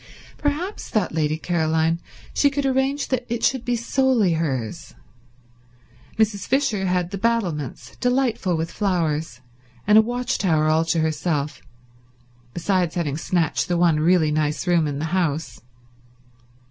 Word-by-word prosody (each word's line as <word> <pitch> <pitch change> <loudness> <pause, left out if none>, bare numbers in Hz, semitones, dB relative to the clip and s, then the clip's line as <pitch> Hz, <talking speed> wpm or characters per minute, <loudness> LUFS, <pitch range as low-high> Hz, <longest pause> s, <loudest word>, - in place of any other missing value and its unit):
Perhaps, 310 +8 -2
thought 210 -5 0
Lady 155 -1 0
Caroline, 160 0 0 0.3
she 285 - +3
could 280 0 -2
arrange 270 +2 0
that 255 -2 0
it 235 0 -3
should 260 -3 +2
be 245 0 0
solely 235 -4 +2
hers. 135 -9 -3 1.2
Mrs. 215 -2 +1
Fisher 235 -8 +1
had 180 -1 0
the 195 - -4
battlements, 170 - -2
delightful 245 -8 +1
with 165 +1 -3
flowers, 160 - -1 0.4
and 210 +2 +7
a - - +8
watch 245 +3 -2
tower 160 -6 +2
all 160 +1 +3
to 165 0 +1
herself, 150 -2 -1 0.9
besides 175 +2 0
having 155 -6 -1
snatched 160 -5 0
the 175 -1 0
one 170 -3 +3
really 160 -1 +3
nice 150 +1 -1
room 170 -3 +2
in 145 -1 -3
the 155 - -2
house. 165 -4 -1
175 Hz, 140 wpm, -23 LUFS, 155-230 Hz, 1.2 s, a